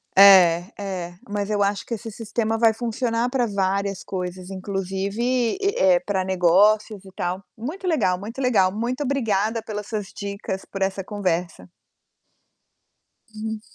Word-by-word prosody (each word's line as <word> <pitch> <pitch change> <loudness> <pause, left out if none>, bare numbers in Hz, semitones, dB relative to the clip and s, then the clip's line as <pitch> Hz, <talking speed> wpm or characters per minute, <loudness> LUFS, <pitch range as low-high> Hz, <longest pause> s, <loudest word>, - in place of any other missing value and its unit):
É, 180 -3 +8
é, 185 -3 -4 0.2
mas 205 0 -2
eu 205 -1 0
acho 200 0 0
que 235 - -5
esse 225 0 -5
sistema 225 +1 -2
vai 225 -1 +4
funcionar 235 +1 -1
pra 250 -2 +1
várias 195 -1 -1
coisas, 185 0 -5
inclusive 195 +2 -3
e 245 +2 +1 0.2
e, 185 -2 +5
pra 190 0 -1
negócios 195 +3 +3
e 190 - -12
tal. 180 +2 -3
Muito 315 - -6
legal, 200 - +2
muito 230 +7 -6
legal. 210 -7 +3
Muito 240 +7 -2
obrigada 225 -5 0
pelas 210 -2 -6
suas 210 -4 -3
dicas, 200 -1 -5
por 195 - -6
essa 190 0 0
conversa. 180 -3 -3 1.6
Hum. 220 0 -5
200 Hz, 145 wpm, -23 LUFS, 190-225 Hz, 1.6 s, É